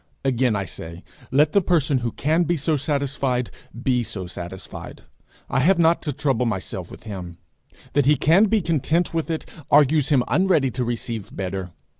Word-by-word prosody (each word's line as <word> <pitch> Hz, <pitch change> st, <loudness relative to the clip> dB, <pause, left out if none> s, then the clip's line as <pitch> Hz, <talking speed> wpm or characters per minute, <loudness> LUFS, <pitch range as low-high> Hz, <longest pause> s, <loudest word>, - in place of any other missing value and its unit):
Again 125 Hz, -3 st, +2 dB
I 100 Hz, -1 st, -1 dB
say, 85 Hz, 0 st, -9 dB, 0.3 s
let 145 Hz, +3 st, +3 dB
the 200 Hz, -, +5 dB
person 155 Hz, -7 st, +2 dB
who 120 Hz, -1 st, -2 dB
can 155 Hz, +8 st, +1 dB
be 175 Hz, 0 st, +1 dB
so 155 Hz, +2 st, 0 dB
satisfied 140 Hz, -3 st, -1 dB, 0.3 s
be 125 Hz, -3 st, +2 dB
so 100 Hz, -5 st, -5 dB
satisfied; 90 Hz, +1 st, -8 dB, 0.4 s
I 135 Hz, -, 0 dB
have 175 Hz, +8 st, +4 dB
not 170 Hz, 0 st, +3 dB
to 150 Hz, -, -2 dB
trouble 135 Hz, -4 st, 0 dB
myself 95 Hz, -4 st, -4 dB
with -, -, -12 dB
him. 90 Hz, -5 st, -7 dB, 0.6 s
That 145 Hz, -2 st, +2 dB
he 150 Hz, -, +6 dB
can 165 Hz, +9 st, +4 dB
be 215 Hz, 0 st, +2 dB
content 165 Hz, +1 st, 0 dB
with 165 Hz, 0 st, -1 dB
it, 160 Hz, -1 st, -2 dB, 0.2 s
argues 145 Hz, 0 st, +4 dB
him 135 Hz, -5 st, +4 dB
unready 175 Hz, -8 st, +2 dB
to 125 Hz, +2 st, -2 dB
receive 115 Hz, -3 st, -3 dB
better. 95 Hz, -1 st, -4 dB
135 Hz, 175 wpm, -23 LUFS, 115-160 Hz, 0.6 s, he